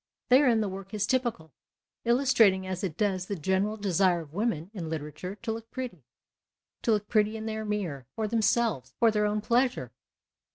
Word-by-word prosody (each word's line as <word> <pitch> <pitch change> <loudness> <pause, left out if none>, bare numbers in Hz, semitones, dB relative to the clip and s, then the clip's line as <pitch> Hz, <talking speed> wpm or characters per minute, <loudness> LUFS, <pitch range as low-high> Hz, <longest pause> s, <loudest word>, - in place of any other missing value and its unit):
Therein 250 -3 +5
the 210 - 0
work 195 +1 -7
is 205 -1 +1
typical, 225 - -1 0.5
illustrating 235 -6 +4
as 185 0 -4
it 170 -5 -3
docs 190 -3 0
the 200 - -3
general 190 +5 0
desire 185 -3 +2
of 150 -2 -13
women 195 -4 -1
in 170 -6 -5
literature 155 +4 -5
to 225 +1 -4
look 225 0 -6
pretty 245 - -6 0.4
— - - -63
to 230 - +1
look 210 -1 -1
pretty 215 0 +2
in 220 - -6
their 220 0 -3
mirror, 180 - -3
for 220 -1 -1
themselves, 225 - +1
for 230 -2 +4
their 210 -1 +2
own 210 0 -1
pleasure. 240 - +1
210 Hz, 180 wpm, -28 LUFS, 185-225 Hz, 0.5 s, Therein